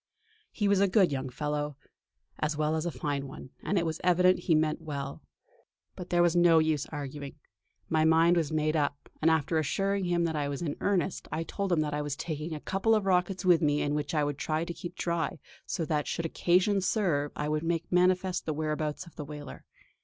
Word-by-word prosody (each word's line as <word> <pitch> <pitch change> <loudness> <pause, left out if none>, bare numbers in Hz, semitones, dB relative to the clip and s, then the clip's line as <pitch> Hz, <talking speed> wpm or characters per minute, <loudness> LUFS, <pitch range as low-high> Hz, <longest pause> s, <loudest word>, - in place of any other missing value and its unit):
He 205 - 0
was 200 -1 +3
a 200 - +4
good 190 -2 +4
young 135 -1 -2
fellow, 150 +1 -3 0.6
as 150 0 -1
well 155 +1 +1
as 160 +2 -1
a - - -1
fine 140 -2 -3
one, 135 -1 -10
and 200 - -1
it 170 - +1
was 160 -1 -3
evident 180 +1 +4
he 165 - +6
meant 155 +1 +1
well. 140 -3 -5 0.7
But 180 -2 -8
there 175 0 +3
was 175 0 +3
no 175 -1 +6
use 155 -2 +1
arguing; 145 -1 -6 0.5
my 160 -1 +2
mind 165 +2 +5
was 160 -4 0
made 155 0 +1
up, 145 -2 -1
and, 160 - +4
after 160 0 +2
assuring 195 +6 0
him 175 -1 +1
that 165 -2 -1
I 145 -1 -1
was 140 +4 -4
in 150 -4 -2
earnest, 190 -2 0
I 160 - -1
told 195 +3 -3
him 165 -3 +3
that 150 -1 -2
I 150 - -1
was 145 -2 -3
taking 155 +1 -4
a - - -5
couple 195 +7 +1
of 210 -2 0
rockets 185 0 +1
with 175 -3 +5
me 145 -1 +2
which 150 +1 -2
I 150 - +2
would 145 -1 -2
try 155 +1 -1
to 170 - -5
keep 175 +2 -8
dry 170 -3 -1 0.3
so 165 - -2
that 150 -2 -1
should 165 - -2
occasion 180 +4 +2
serve 175 -8 0
I 150 - -2
would 150 0 0
make 165 0 -1
manifest 180 0 +2
the 155 - -1
whereabouts 155 +2 -2
of 170 - -16
the 150 - -4
whaler. 145 -1 -9
160 Hz, 220 wpm, -29 LUFS, 150-175 Hz, 0.7 s, he